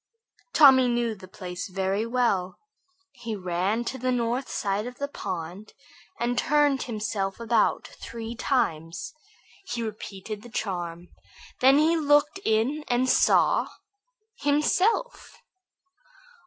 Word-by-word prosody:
Tommy 265 -4 +7
knew 240 -1 0
the 190 -3 -12
place 180 +1 -6
very 195 +3 -1
well. 230 -7 0 0.5
He 230 -5 -6
ran 190 +5 -1
to 260 - -4
the 255 +1 0
north 245 +2 -1
side 205 +2 -2
of 245 0 -9
the 280 - -2
pond, 185 - -6 0.5
and 245 +1 0
turning 290 -1 +3
himself 210 -4 -3
around 230 0 +2
three 230 0 -8
times, 165 - -1 0.5
he 235 -9 -3
repeated 210 -1 -6
the 240 - -12
charm. 175 -6 -4 0.5
Then 265 +2 +6
he 315 +3 +4
looked 295 +4 +3
in 235 +8 +1
and 245 +1 +1
saw - - +4 0.7
himself. 365 - +1
230 Hz, 115 wpm, -26 LUFS, 195-265 Hz, 0.7 s, Tommy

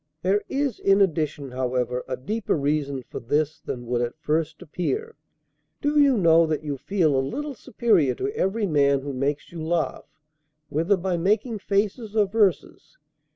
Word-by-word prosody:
There 195 +3 +2
is 275 -4 -1
in 195 0 +4
addition, 155 -7 0
however, 125 -1 -1
a 130 -1 -3
deeper 215 - -1
reason 140 -2 -1
for - - -7
this 150 +5 -1
than 120 -1 -5
would 120 0 0
at 120 +4 -3
first 155 0 -1
appear. 420 - -3 0.7
Do 295 +1 +2
you 280 -4 +5
know 165 -3 +5
that 155 -1 -2
you 145 -2 -3
feel 160 +1 +1
a 135 - +3
little 285 - -4
superior 210 - +1
to 415 +2 -3
every 210 - 0
man 140 -5 +3
who 140 0 -5
makes 140 +3 -2
you 170 -2 -7
laugh, 165 0 -1 0.6
whether 165 +7 +2
by 180 0 -1
making 210 +5 0
faces 205 +2 -1
or 210 -2 +4
verses? 205 - 0
165 Hz, 165 wpm, -24 LUFS, 140-210 Hz, 0.7 s, you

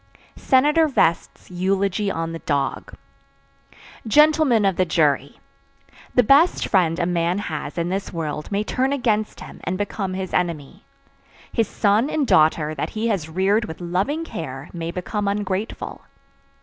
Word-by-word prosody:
SENATOR 295 +5 +3
VEST'S 170 - 0
EULOGY 195 +2 0
ON 165 -3 -3
THE 165 - -6
DOG. 140 -3 -2 1.1
"Gentlemen 300 -4 +4
of 195 -2 +2
the 185 - +2
Jury: 150 -4 0 0.8
The 250 - +6
best 285 +9 +4
friend 170 -5 +2
a 175 - 0
man 175 +1 0
has 155 -7 -5
in 170 0 -1
this 195 +1 -3
world 155 -1 -4
may 205 +1 0
turn 260 +5 0
against 215 -6 -1
him - - -11
and 185 - -2
become 195 -1 -3
his 190 -1 -5
enemy. 165 -6 -2 0.7
His 225 -3 +1
son 210 +7 +1
and 305 -2 0
daughter 155 -4 +3
that 145 - -3
he 220 +2 -2
has 175 -8 -2
reared 195 +6 +1
with 160 - -8
loving 190 - -1
care 145 - -7
may 165 -1 -4
become 200 +4 -3
ungrateful. 200 +1 -3
190 Hz, 150 wpm, -22 LUFS, 165-220 Hz, 1.1 s, The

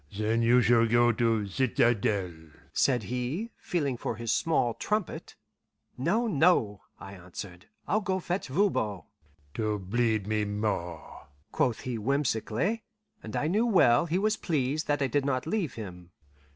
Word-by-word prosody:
"Then 110 +2 +1
you 120 +2 +5
shall 115 +1 +4
go 120 +1 +4
to 115 -2 +1
citadel," 105 -4 +1 0.4
said 125 -5 +2
he, 125 - -3
feeling 145 -8 -1
for 115 - -3
his 115 0 -3
small 140 -8 +1
trumpet. 210 - -3 0.6
"No, 180 - +1
no," 150 - +2 0.2
I 95 0 -9
answered; 90 0 -9 0.2
"I'll 215 +4 +1
go 190 -1 -1
fetch 180 +2 -3
Voban." 130 - 0 0.5
"To 110 -1 -1
bleed 110 +2 0
me 105 0 0
more!" 100 -6 -4 0.2
quoth 120 -3 0
he 120 -3 -4
whimsically; 135 - 0 0.4
and 110 - -7
I - - 0
knew 210 +9 +2
well 170 - +4
he 170 +3 0
was 215 +2 +1
pleased 150 -3 -1
that 145 -1 +1
I - - +2
did 140 +3 0
not 130 -2 -1
leave 170 - -2
him. 90 -6 -8
120 Hz, 150 wpm, -28 LUFS, 105-160 Hz, 0.6 s, you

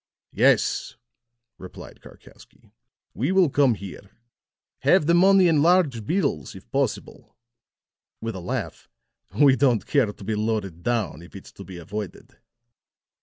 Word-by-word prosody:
"Yes," - - +1 0.6
replied 90 - -12
Karkowsky. - - -18 0.4
"We - - -1
will 190 -6 +3
come 135 -5 +3
here. 100 -1 -10 0.7
Have - - +3
the 170 - +3
money 190 +1 +5
in 155 -3 +3
large 155 - +2
bills, 140 - -1
if - - -13
possible," - - -3 0.8
with 115 0 -5
a 95 - -7
laugh; 100 -2 -5 0.5
"we 140 -3 +6
don't 125 -6 +1
care 130 -8 +1
to 105 - -14
be 110 - -3
loaded 105 -5 -3
down, 105 - -2
if 85 - -15
it's 95 - -11
to 100 - -12
be 95 -2 -10
avoided." 95 +3 -8
115 Hz, 135 wpm, -24 LUFS, 95-145 Hz, 0.8 s, we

